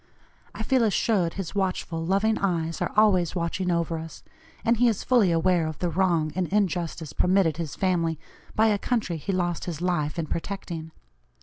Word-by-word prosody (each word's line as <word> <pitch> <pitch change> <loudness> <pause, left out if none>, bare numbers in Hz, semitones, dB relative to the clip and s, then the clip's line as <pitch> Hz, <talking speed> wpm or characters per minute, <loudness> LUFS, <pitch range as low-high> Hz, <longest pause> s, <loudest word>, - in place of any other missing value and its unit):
I 220 - -4
feel 260 +2 +2
assured 205 -5 +1
his 195 -4 -5
watchful, 185 -4 -2
loving 200 +5 +1
eyes 165 -4 -1
are - - -1
always 190 -6 +4
watching 180 +2 -1
over 170 -1 0
us, 160 -2 -9 0.4
and 230 0 +3
he 245 +2 +4
is 220 -4 0
fully 235 -8 +4
aware 170 0 +2
of 155 -2 -5
the 175 -1 -1
wrong 170 -3 +1
and 185 -1 -1
injustice 175 -5 -1
permitted 180 -4 +2
his 165 -4 -4
family 170 -4 0 0.4
by 220 +1 +4
a 205 -1 +1
country 215 -9 -1
he 180 +6 -3
lost 175 -3 -1
his 165 -4 -4
life 175 -3 -1
in 165 - -1
protecting. 165 -1 -5
180 Hz, 180 wpm, -26 LUFS, 165-195 Hz, 0.4 s, always